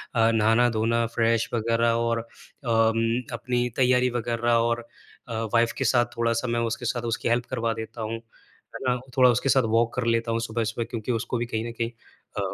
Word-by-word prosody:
अ, 115 -1 +4
नहाना-धोना 115 +1 +2
fresh 115 0 +2
वग़ैरह 115 0 +2
और 115 0 0
अम, 115 0 -1
अपनी 125 +1 -1
तैयारी 125 -1 +3
वग़ैरह 120 0 -1
और 115 0 +2 0.5
अ, 115 - -6 0.2
वाइफ़ 115 0 +3
के 135 - -1
साथ 120 +1 +4
थोड़ा-सा 115 +1 0
मैं 120 0 0
उसके 120 - -4
साथ 120 +1 -1
उसकी 115 - -2
हेल्प 120 +1 +1
करवा 115 -3 -1
देता 110 +1 -8
हूँ, 110 +1 -3
है 115 0 -16
ना। 125 0 +1 0.2
थोड़ा 125 -1 +7
उसके 125 +3 +1
साथ 130 -1 +4
वॉक 115 0 +2
कर 125 -2 -1
लेता 115 0 +1
हूँ 115 - 0
सुबह-सुबह 115 +1 -2
क्योंकि 115 +1 -3
उसको 120 +1 -2
भी 120 - -1
कहीं 115 -1 -3
न - - -5
कहीं 115 +1 -1 0.5
अ, 100 -1 -2
115 Hz, 190 wpm, -25 LUFS, 115-120 Hz, 0.5 s, थोड़ा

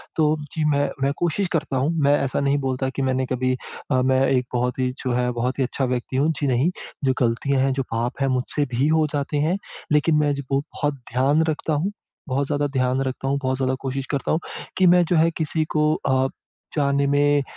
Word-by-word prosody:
तो 155 -1 +3 0.2
जी 160 - -1
मैं 145 0 +2
मैं 140 - +2
कोशिश 175 +3 0
करता 150 -4 0
हूँ। 135 +4 +1
मैं 140 +1 +5
ऐसा 135 - -1
नहीं 140 0 +2
बोलता 130 -1 -1
कि 135 - -4
मैंने 130 0 +1
कभी 130 0 0 0.4
अ, 130 -1 +3
मैं 130 0 +3
एक 125 -2 +2
बहुत 125 +1 -1
ही 130 0 +1
जो 130 - -1
है 125 0 +1
बहुत 125 +3 -2
ही - - +3
अच्छा 130 +1 -1
व्यक्ति 125 +1 -2
हूँ, 150 +4 +3
जी 145 - 0
नहीं। 130 +5 +2 0.3
जो 130 -1 +3
गलतियाँ 130 +3 +1
हैं, 135 0 +2
जो 135 0 -1
पाप 120 +4 -2
हैं 135 - +3
मुझसे 130 +3 0
भी 135 +4 +2
हो 160 0 +3
जाते 145 +1 -1
हैं। 160 +6 +1 0.3
लेकिन 150 +2 +3
मैं 145 -1 +2
जो 140 - -5
हूँ 135 0 +2
बहुत 145 -1 -1 0.2
ध्यान 140 +5 +3
रखता 155 0 -1
हूँ। 160 +7 0 0.4
बहुत 135 +2 0
ज़्यादा 145 0 0
ध्यान 130 0 +1
रखता 135 0 -3
हूँ, 140 +1 +1
बहुत 130 0 0
ज़्यादा 130 0 0
कोशिश 135 0 -3
करता 140 -3 -1
हूँ 160 - +2 0.4
कि 185 - +5
मैं 175 0 +6
जो 175 - +1
है 165 +1 +4
किसी 160 0 0
को 150 0 +3
अ, 140 - -2 0.2
ब - - -8 0.5
जाने 140 -1 +2
में 145 +1 +3
140 Hz, 230 wpm, -23 LUFS, 130-150 Hz, 0.5 s, मैं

